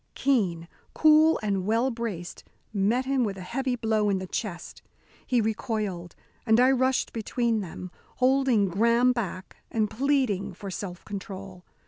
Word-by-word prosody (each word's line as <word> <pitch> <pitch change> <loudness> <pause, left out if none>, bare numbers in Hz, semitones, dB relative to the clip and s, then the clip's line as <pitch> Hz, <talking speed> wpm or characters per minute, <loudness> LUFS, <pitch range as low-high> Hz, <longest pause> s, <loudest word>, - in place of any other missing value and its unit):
Keene, 190 -12 +1 0.3
cool 310 +1 +5
and 200 -3 0
well 230 +4 +2
braced, 220 -7 -5 0.3
met 220 +6 +1
him 265 -1 +1
with 200 -3 -2
a - - -7
heavy 255 +7 -2
blow 220 -3 +1
in 195 - +1
the 190 - -4
chest. 180 -2 -5 0.5
He 250 -2 +2
recoiled, 210 -5 -3 0.3
and 225 -1 +4
I 255 +1 +6
rushed 260 0 +1
between 230 0 -1
them, 180 0 -8 0.2
holding 255 -5 +3
Graham 235 +6 +3
back, 195 -6 -5
and 215 -2 0
pleading 235 -8 0
for 195 +1 -7
self 180 -1 -6
control. 195 -2 -8
220 Hz, 145 wpm, -27 LUFS, 195-250 Hz, 0.5 s, I